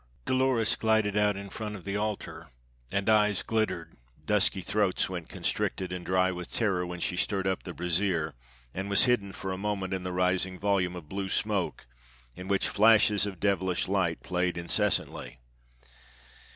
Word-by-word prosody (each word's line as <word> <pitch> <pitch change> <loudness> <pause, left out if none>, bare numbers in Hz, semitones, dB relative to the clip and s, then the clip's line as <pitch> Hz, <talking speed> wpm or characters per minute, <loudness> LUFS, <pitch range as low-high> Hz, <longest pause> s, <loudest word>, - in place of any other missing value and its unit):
Dolores 130 -4 +2
glided 110 -2 +2
out 105 -1 +2
in 100 -1 -8
front 105 -2 -5
of 95 - -10
the 100 0 -3
altar, 105 0 -3 0.4
and 100 +1 -1
eyes 105 -2 +3
glittered, 110 -7 -2 0.3
dusky 100 -2 +2
throats 100 +1 +1
went 90 -3 -6
constricted 95 -1 -2
and 90 -1 -5
dry 95 +1 +2
with 90 -1 -6
terror 95 -6 0
when 90 0 -6
she 90 - -1
stirred 95 +1 0
up 95 -1 0
the 90 - -7
brazier 85 -2 0 0.4
and 95 +2 -4
was 100 - +5
hidden 120 -6 +2
for 95 0 -5
a 95 - -4
moment 100 -2 -2
in 95 - -2
the 90 0 -4
rising 90 +1 +1
volume 95 -2 +1
of 85 -4 -9
blue 95 +3 -4
smoke 100 -8 -1 0.5
in 90 - -8
which 100 -1 +1
flashes 105 -1 +4
of 95 -4 -7
devilish 95 -3 0
light 95 -4 0
played 90 -1 -1
incessantly. 85 -6 -1
95 Hz, 165 wpm, -29 LUFS, 90-105 Hz, 0.5 s, was